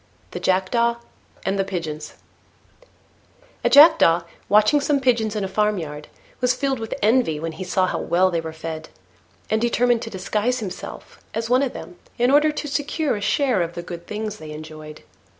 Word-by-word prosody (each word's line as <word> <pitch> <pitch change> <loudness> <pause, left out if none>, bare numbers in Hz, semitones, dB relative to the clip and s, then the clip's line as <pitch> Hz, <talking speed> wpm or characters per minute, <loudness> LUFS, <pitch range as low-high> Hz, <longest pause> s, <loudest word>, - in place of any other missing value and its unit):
THE - - -5
JACKDAW 235 +6 +1 0.5
AND 195 +1 0
THE - - +3
PIGEONS 165 -5 -5 1.5
A - - +3
Jackdaw, 285 - +7 0.3
watching 215 +8 +5
some 285 0 +1
Pigeons 230 -5 +1
in 210 - -1
a - - -1
farmyard, 190 -7 -2 0.3
was 250 0 +2
filled 270 -1 -1
with 225 -1 -4
envy 220 -8 +3
when 165 +1 -3
he 160 +4 -7
saw 185 +1 +1
how - - -2
well 185 +2 +2
they 170 -1 0
were 160 0 -6
fed, 160 0 -7 0.6
and 220 0 +2
determined 240 0 +2
to 225 - -5
disguise 210 +5 -1
himself 205 -7 -8 0.2
as 230 +1 -2
one 255 +1 +5
of 275 -3 -1
them, 175 - -9 0.2
in 245 +2 +3
order 300 +2 +5
to 300 0 -5
secure 290 0 -1
a 205 - -5
share 235 0 +1
of 170 0 -3
the 175 - -5
good 170 0 -8
things 215 0 -4
they 155 - -10
enjoyed. 155 0 -9
210 Hz, 180 wpm, -22 LUFS, 170-245 Hz, 1.5 s, Jackdaw